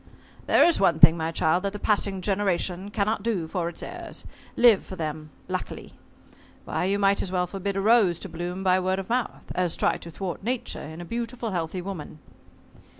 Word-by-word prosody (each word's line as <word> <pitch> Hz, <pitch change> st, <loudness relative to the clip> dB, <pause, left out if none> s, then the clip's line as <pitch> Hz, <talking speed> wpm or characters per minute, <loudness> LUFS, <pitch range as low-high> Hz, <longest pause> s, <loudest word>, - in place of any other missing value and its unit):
"There -, -, +6 dB
is 345 Hz, -, +4 dB
one 175 Hz, -4 st, +4 dB
thing, 160 Hz, +1 st, +8 dB
my 160 Hz, 0 st, -2 dB
child, 165 Hz, +2 st, +2 dB
that 200 Hz, +1 st, -2 dB
the -, -, -4 dB
passing 200 Hz, -2 st, 0 dB
generation 190 Hz, -1 st, 0 dB
cannot 205 Hz, +1 st, 0 dB
do 195 Hz, -7 st, -1 dB
for 170 Hz, 0 st, -2 dB
its 170 Hz, -, -6 dB
heirs -, -, -8 dB, 0.3 s
live 235 Hz, -5 st, +6 dB
for 190 Hz, -, -8 dB
them 155 Hz, -2 st, -5 dB, 0.2 s
luckily. -, -, -5 dB, 0.7 s
Why, -, -, -1 dB
you 195 Hz, +2 st, +1 dB
might 200 Hz, 0 st, +3 dB
as 185 Hz, -, -3 dB
well 180 Hz, -1 st, +1 dB
forbid 195 Hz, +2 st, -3 dB
a -, -, +1 dB
rose 210 Hz, -5 st, +4 dB
to -, -, -5 dB
blossom 175 Hz, +3 st, -5 dB
by 185 Hz, -1 st, +4 dB
word 185 Hz, +1 st, 0 dB
of 195 Hz, +1 st, -5 dB
mouth, 245 Hz, +1 st, -2 dB
as 180 Hz, -2 st, 0 dB
try -, -, +1 dB
to 170 Hz, -, -9 dB
thwart 180 Hz, +2 st, -5 dB
nature 245 Hz, +4 st, -2 dB
in 160 Hz, +3 st, -8 dB
a -, -, -7 dB
beautiful 235 Hz, +2 st, -4 dB
healthy 175 Hz, 0 st, -3 dB
woman." 180 Hz, -6 st, -7 dB
190 Hz, 200 wpm, -26 LUFS, 175-205 Hz, 0.7 s, thing